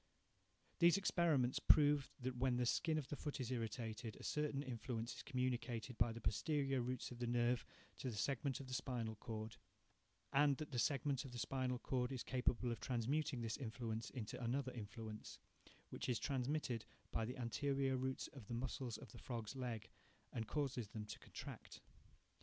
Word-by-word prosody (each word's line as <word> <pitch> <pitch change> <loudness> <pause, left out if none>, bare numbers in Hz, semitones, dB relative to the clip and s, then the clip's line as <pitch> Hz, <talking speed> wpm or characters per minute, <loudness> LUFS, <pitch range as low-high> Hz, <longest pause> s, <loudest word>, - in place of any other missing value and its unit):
These 170 +1 +8
experiments 160 -10 +3
prove 145 -2 +6
that 130 +1 -1
when 125 0 +2
the 125 - +3
skin 160 +6 +3
of 145 -4 -1
the - - -1
foot 145 0 -3
is 125 -1 -2
irritated, 115 -1 -2
a - - -11
certain 150 -2 0
influence 120 -2 -2
is - - -5
communicated 125 -2 -1
by 120 - +5
the 115 - -5
posterior 135 +5 +2
roots 125 +1 -2
of 120 - -7
the 120 - 0
nerve 120 0 +3 0.4
to 130 - -1
the 115 - -4
segment 135 +3 +1
of 135 - -6
the 130 - -5
spinal 120 -4 -1
cord; 110 0 -5 0.8
and 140 -1 +6
that 155 -1 -5
the 125 - 0
segment 140 0 +2
of 135 -3 -8
the - - -4
spinal 130 0 0
cord 125 -1 0
is 130 -3 -2
capable 125 -1 +1
of 115 - -2
transmuting 130 +2 +1
this 115 -1 -1
influence 115 -2 -3
into 120 -1 -4
another 130 +2 +1
influence, 110 -1 -6 0.5
which - - -3
is 120 - +3
transmitted 130 -3 0 0.3
by 115 - +1
the 125 +3 -3
anterior 135 +2 +1
roots 130 +1 -1
to 140 - -8
the 115 0 -5
muscles 120 -1 -2
of - - -10
the - - -10
frog's 115 -1 -4
leg, 120 -5 -3 0.5
and 110 -2 -2
causes 135 -4 0
them 105 +1 -5
to - - -7
contract. - - -8
125 Hz, 180 wpm, -42 LUFS, 115-135 Hz, 0.8 s, These